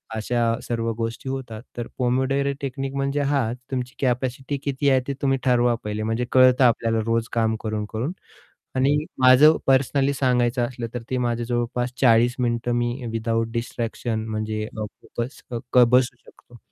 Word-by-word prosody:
अशा 120 +2 -1 0.2
सर्व 115 -1 -2
गोष्टी 115 +3 -4
होतात 125 -5 -5 0.2
तर 120 - -3
पोमोडोरो 130 +2 +1
टेक्निक 135 0 -4
म्हणजे 140 +1 0
हा 140 -1 +2 0.3
तुमची 125 -1 -3
कॅपॅसिटी 130 +2 -1
किती 140 0 0
आहे 135 -1 +4
ते 140 - -1
तुम्ही 135 -1 +2
ठरवा 120 -1 +3
पहिले 105 0 -3
म्हणजे 115 +3 -1
कळतं 130 0 +6
आपल्याला 115 -1 +2
रोज 115 0 0
काम 110 -1 +1
करून-करून 110 +5 -3 0.7
आणि 135 +3 +3 0.3
माझं 135 +5 +7
पर्सनली 135 +1 +3
सांगायचं 125 -2 +1
असलं 120 -2 -5
तर 120 - -4
ते 130 - 0
माझ्या 120 0 -1
जवळपास 120 0 -1
40 120 -1 +5
मिनिटं 120 0 0
मी 120 +2 -2
विदाऊट 115 0 -1
डिस्ट्रॅक्शन 115 -1 -3
म्हणजे 110 0 -3
अ, 110 -1 -6
फोकस्ड 120 +4 -7 0.2
क 125 -1 +7
बसू 125 -1 +3
शकतो. 120 - -18
120 Hz, 155 wpm, -23 LUFS, 115-130 Hz, 0.7 s, माझं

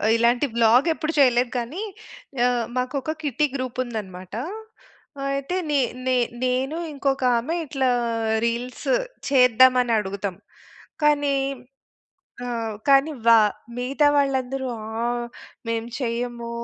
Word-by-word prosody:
ఇలాంటి 240 +4 +3
వ్లాగెప్పుడు 280 +8 +3
చేయలేదు. 245 -2 +4
కానీ 280 - -5 0.6
ఆహ్, 245 -2 +1
మాకొక 270 +5 -2
కిట్టీ 295 +1 +1
గ్రూప్ 255 -1 -4
ఉందన్నమాట. 190 -6 -7 1.0
అయితే 275 +6 -2
నె 290 -1 +2 0.3
నె 255 -1 +2 0.3
నేను 260 +4 0 0.2
ఇంకొక 275 -1 -1
ఆమె 255 +9 -2
ఇట్లా 265 -2 0 0.6
రీల్స్ 240 +2 -3 0.4
చేద్దామని 250 -1 +5
అడుగుతాం. 195 -1 -4 0.7
కానీ 290 -2 +3 1.1
ఆహ్, 230 -3 -3
కానీ 275 +3 +5 0.2
వా 230 - +9 0.4
మిగతా 270 +4 +2
వాళ్ళందరూ 270 -2 0 0.2
ఆహ్, 240 +2 -2 0.4
మేము 230 0 -2
చెయ్యము. 235 -1 -3
250 Hz, 100 wpm, -23 LUFS, 235-275 Hz, 1.1 s, వా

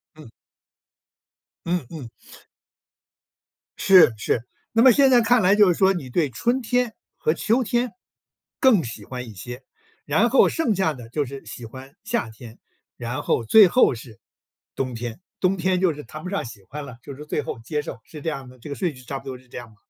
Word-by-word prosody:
嗯。 155 -6 -13 1.4
嗯 170 -4 -1
嗯。 145 -8 -8 1.7
是， 185 -10 +6
是。 110 +2 -1 0.3
那 225 - +3
么 260 +1 +8
现 275 +2 +5
在 245 - +6
看 235 +1 +4
来 185 +2 +4
就 205 -3 +6
是 170 - -2
说， 190 0 +4
你 155 -9 -6
对 150 +3 +1
春 240 - 0
天 245 0 0 0.2
和 155 - +1
秋 230 +9 +1
天， 240 +2 0 0.7
更 245 - +5
喜 115 -4 -8
欢 125 +1 -7
一 110 - -10
些， 120 +7 -9 0.4
然 195 +12 +2
后 265 - +5
剩 280 -10 0
下 190 -4 +1
的 120 -4 -11
就 145 +4 -1
是 135 0 -9
喜 115 +2 -9
欢 130 +5 -11
夏 225 - -2
天， 110 +1 -13 0.4
然 120 +1 -4
后 - - +1
最 210 - +8
后 215 - +4
是 115 -3 -12 0.6
冬 130 -2 -2
天。 115 0 -6 0.2
冬 190 +1 +1
天 185 +1 0
就 180 -4 +3
是 150 0 -9
谈 155 0 -10
不 180 - -5
上 195 - -2
喜 115 -4 -11
欢 145 +9 -8
了， 125 -4 -11
就 140 - -8
是 150 +2 -10
最 150 - -2
后 130 - -6
接 150 +6 -3
受 125 - -8
是 150 - -11
这 165 - -2
样 135 -4 -6
的， 125 0 -15
这 150 - -10
个 140 - -4
顺 170 -4 -2
序 125 - -14
差 135 +3 -5
不 - - -19
多 130 -2 -6
是 125 - -22
这 - - -9
样 120 -2 -8
的。 110 - -21
150 Hz, 225 characters per minute, -23 LUFS, 125-195 Hz, 1.7 s, 么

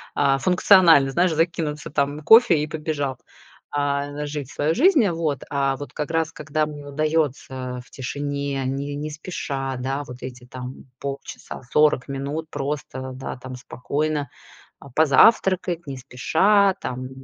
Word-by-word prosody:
а 135 -1 +3
функционально, 180 -5 +5
знаешь, 175 +4 +2
закинуться 160 -2 -1
там 145 +1 0
кофе 220 -1 +7
и 150 - 0
побежал, 150 -4 -3 0.5
а, 145 0 -1
жить 145 -3 -5
свою 150 +3 0
жизнь. 295 - +5
Вот. 160 -5 -2
А 135 -1 +1
вот 145 - -8
как 150 - -4
раз, 165 -1 0
когда 155 0 -1
мне 145 -1 -9
удаётся 140 -4 -2
в - - -24
тишине, 140 +1 -3
не 140 +2 -3
не 150 +1 -4
спеша, 140 -4 -4
да, 135 +3 -2
вот 125 +1 -10
эти 125 -1 -8
там 125 0 -9
полчаса, 140 0 -7
40 150 -4 +3
минут 140 +4 -4
просто, 135 -2 -4
да 130 +1 -6
там, 130 +1 -8
спокойно, 145 +4 -3 0.5
а, 140 - -13
позавтракать 175 - +4
не 135 -1 -5
спеша, 190 - +2
там 130 0 -5
145 Hz, 145 wpm, -23 LUFS, 135-155 Hz, 0.5 s, кофе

